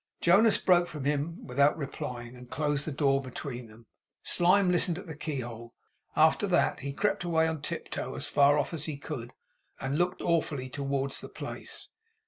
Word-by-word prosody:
Jonas 205 +6 +5
broke 175 -1 +4
from 150 -5 -6
him 150 +3 -1
without 140 +5 +3
replying, 125 -4 -5
and 125 0 -12
closed 145 -1 -1
the - - -1
door 135 -1 +2
between 125 -2 -6
them. 110 +2 -16 0.4
Slyme 180 +2 +3
listened 175 -1 +1
at 190 - -8
the 160 - -7
keyhole. 120 -6 -5 0.4
After - - +4
that, - - +2
he 140 - -4
crept 200 +6 0
away 160 -2 +2
on 160 -2 -3
tiptoe, - - -4
as - - -4
far 145 +1 +4
off 145 +3 -1
as 160 -2 -4
he 150 -3 -4
could; 130 -5 -6 0.5
and 135 +4 -1
looked 175 +1 0
awfully 155 -6 0
towards 140 0 -2
the - - -8
place. - - -7
145 Hz, 175 wpm, -29 LUFS, 135-165 Hz, 0.5 s, Jonas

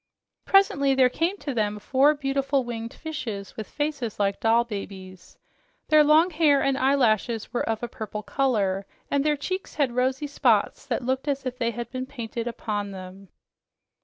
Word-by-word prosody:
Presently 280 -9 +4
there 260 -1 +5
came 335 +9 -1
to 285 -7 -4
them 210 -3 0
four 270 +7 +3
beautiful 275 -1 0
winged 230 -1 -5
fishes 240 -11 -6
with 220 - -7
faces 290 -7 -3
like 200 -1 +1
doll 230 +1 +3
babies. 190 -4 -8 0.5
Their 305 -1 +7
long 310 +4 +5
hair 300 -3 +4
and 275 0 +1
eyelashes 240 -5 +1
were 240 - -1
of 225 +1 -2
a - - -1
purple 215 -1 -6
color, 200 -9 0 0.2
and 280 -1 +2
their 300 -1 +1
cheeks 370 +6 -4
had 280 -5 +1
rosy 260 +3 0
spots 285 - +1
that 250 - -2
looked 260 +3 -1
as 275 -1 -1
if 255 0 -4
they 230 -1 +1
had 235 0 -6
been 255 0 -4
painted 235 -3 -5
upon 210 -3 -3
them. 190 0 -10
255 Hz, 170 wpm, -25 LUFS, 220-280 Hz, 0.5 s, Their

